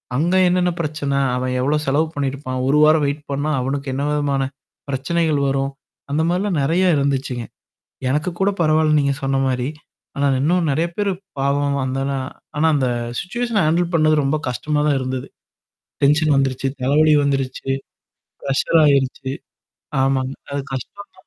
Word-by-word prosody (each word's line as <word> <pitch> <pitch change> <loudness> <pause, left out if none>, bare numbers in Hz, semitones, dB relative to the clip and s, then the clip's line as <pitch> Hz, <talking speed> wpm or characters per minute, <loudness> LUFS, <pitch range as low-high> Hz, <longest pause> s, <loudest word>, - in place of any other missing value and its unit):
அங்க 170 +7 +1
என்னென்ன 180 0 +2
பிரச்சன? 150 -2 -3 0.2
அவன் 125 0 -1
எவ்வளோ 145 +3 +2
செலவு 145 +4 +2
பண்ணியிருப்பான்? 135 -2 -3
1 145 +2 +3
வாரம் 155 0 +5
வெயிட் 145 +1 -2
பண்ணா 145 +2 -1
அவனுக்கு 140 +2 -3
என்ன 140 +2 -2
விதமான? 140 -2 0 0.5
பிரச்சனைகள் 155 +2 0
வரும். 135 0 0 0.4
அந்த 155 +2 +1
மாரிலாம் 180 -2 0
நெறைய 170 +6 +2
இருந்துச்சுங்க. 135 -3 -1 0.7
எனக்கு 150 +6 0
கூட 195 +1 +3
பரவால்ல 155 -1 +3
நீங்க 140 -1 +1
சொன்ன 135 0 +1
மாரி. 125 0 -1 0.5
ஆனா 140 0 +1
இன்னும் 170 +2 +2
நெறைய 160 +5 +1
பேரு 205 -1 +1 0.3
பாவம் 140 +1 +1
அந்தால 135 +1 -2 0.5
ஆனா 160 +2 +3
அந்த 130 -3 +1 0.3
சிச்சுவஷன 235 0 -1
ஹேண்டில் 170 +2 +1
பண்ணது 155 -1 +4
ரொம்ப 140 +3 +1
கஷ்டமா 150 +5 -1
தான் 140 -2 +2
இருந்தது. 130 0 -4 0.8
டென்ஷன் 150 +1 +4
வந்துருச்சு. 135 0 0
தலைவல 150 +3 +4
வந்துருச்சு. 135 -1 -2 0.8
ப்ரஷ்ஷர் 140 +4 +2
ஆயிருச்சு. 135 -1 +1 0.7
ஆமாங்க. 135 0 0 0.2
அது 140 -1 -2
கஷ்டம் 130 +10 -7
தான். - - -23
140 Hz, 145 wpm, -20 LUFS, 135-155 Hz, 0.8 s, வாரம்